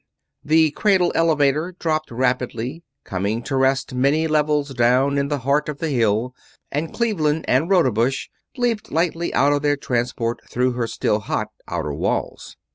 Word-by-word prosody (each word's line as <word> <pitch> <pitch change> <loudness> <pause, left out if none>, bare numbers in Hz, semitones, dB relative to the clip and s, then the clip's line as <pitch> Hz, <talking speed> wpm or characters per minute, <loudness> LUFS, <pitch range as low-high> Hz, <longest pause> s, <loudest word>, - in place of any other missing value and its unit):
The 155 0 +4
cradle 185 +1 +2
elevator 155 +1 +2
dropped 155 -2 -1
rapidly, 125 +3 -2 0.2
coming 100 +5 -2
to 135 - -3
rest 135 0 +1
many 140 +5 +2
levels 150 -2 +1
down 130 +3 +2
in 140 - 0
the 145 0 -1
heart 145 +2 +1
of 150 - -4
the 160 +1 -2
Hill, 115 -1 +1 0.4
and 155 +3 -2
Cleveland 160 -10 0
and 140 +7 +2
Rodebush 130 - +2 0.3
leaped 235 -4 -1
lightly 170 +1 0
out 145 +1 +4
of 145 - 0
their 145 0 +1
transport, 120 -3 -2
through 125 +1 +1
her 120 -1 -2
still 105 - 0
hot 105 - -3 0.2
outer - - -3
walls. - - -3
140 Hz, 155 wpm, -21 LUFS, 125-160 Hz, 0.4 s, The